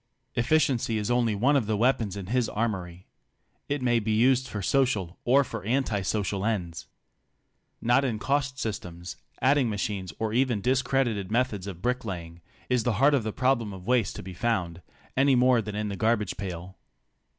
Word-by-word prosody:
Efficiency 125 -3 +1
is 105 +2 -1
only 120 -3 +2
one 130 +8 +3
of 125 -7 +1
the 110 -1 0
weapons 115 -4 +1
in 100 - -5
his 120 +3 0
armory. 95 -5 -3 0.6
It 145 -2 -1
may 120 -1 +3
be 110 0 -1
used 130 +3 +3
for 105 -5 -5
social 105 -9 +1
or 135 +3 +5
for 115 -4 -7
anti 115 -2 0
social 100 0 -1
ends. 90 -7 -2 1.0
Not 120 +4 +4
in 120 -5 -1
cost 140 +2 -1
systems, 90 -7 -5 0.3
adding 135 -2 +4
machines 100 -3 -3
or 110 -1 -2
even 125 -3 +2
discredited 125 -4 0
methods 110 -5 0
of 95 -2 -8
brick 125 +1 0
laying, 85 -5 -6 0.3
is 125 -1 +2
the 120 - +1
heart 135 +8 +4
of 140 - +3
the 110 0 -3
problem 125 -4 0
of 90 -1 -10
waste 120 -4 +1
to - - -7
be 95 0 -8
found, 90 -5 -1 0.3
any 135 0 +4
more 125 -1 +4
than 105 -1 -6
in 105 0 -2
the 100 - -4
garbage 105 0 0
pail. 90 -1 -7
110 Hz, 180 wpm, -27 LUFS, 100-125 Hz, 1.0 s, or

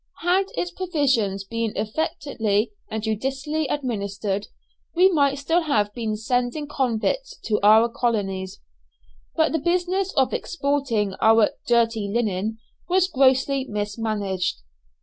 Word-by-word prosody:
Had 365 +3 +3
its 355 - -2
provisions 270 - 0
been 230 +1 -3
efficiently 220 -2 -1 0.2
and 220 -1 -4
judiciously 270 +7 -2
administered, 205 -6 -2 0.5
we 370 +3 +5
might 280 -4 +2
still 325 +5 +1
have 210 -10 0
been 220 -2 -2
sending 245 +6 -1
convicts 275 - -1
to 210 -2 0
our 215 +3 +6
colonies. 195 -6 -2 0.8
But - - +2
the 320 - 0
business 360 +4 0
of 265 -3 +2
exporting 275 - -1
our 220 -1 +5 0.2
"dirty 230 -3 +2
linen" 220 -1 -1 0.3
was 370 +1 +3
grossly 270 -2 +2
mismanaged. 205 - -2
235 Hz, 115 wpm, -23 LUFS, 210-290 Hz, 0.8 s, our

